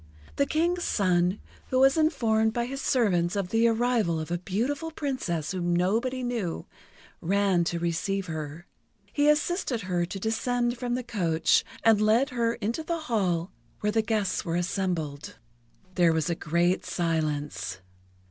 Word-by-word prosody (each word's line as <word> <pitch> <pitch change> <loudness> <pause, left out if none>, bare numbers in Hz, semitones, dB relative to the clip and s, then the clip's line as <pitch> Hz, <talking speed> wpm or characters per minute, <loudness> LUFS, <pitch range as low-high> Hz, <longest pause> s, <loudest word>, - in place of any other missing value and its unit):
The 280 - +2
King's 345 +3 +1
son, 180 -1 +1 0.3
who 255 - 0
was 270 +1 +6
informed 230 -9 +2
by 235 0 0
his 270 +3 -5
servants 185 -9 +2
of 195 -3 -1
the 225 +2 +3
arrival 230 -7 +1
of 155 +1 -5
a 175 - 0
beautiful 250 - -2
Princess 260 - -3
whom 175 -2 0
nobody 230 +9 0
knew, 230 -9 -3 0.6
ran 195 -1 +2
to 170 - -1
receive 175 +3 -1
her. 160 0 -6 0.5
He 290 +1 +3
assisted 300 - +1
her 180 -2 -1
to 195 - -6
descend 240 +3 -1
from 245 -1 -1
the 250 - -3
coach, 175 -9 +2 0.2
and 220 -2 +5
led 230 +6 +3
her 235 -1 0
into 230 +6 -2
the 335 +1 -3
hall 190 - 0 0.3
where 210 - +1
the 225 +1 +2
guests 215 -3 -1
were 165 -1 -2
assembled. 175 -5 -2 0.6
There 175 -2 +4
was 160 +1 0
a - - +2
great 170 +3 +1
silence. 150 - -2
205 Hz, 155 wpm, -27 LUFS, 175-245 Hz, 0.6 s, was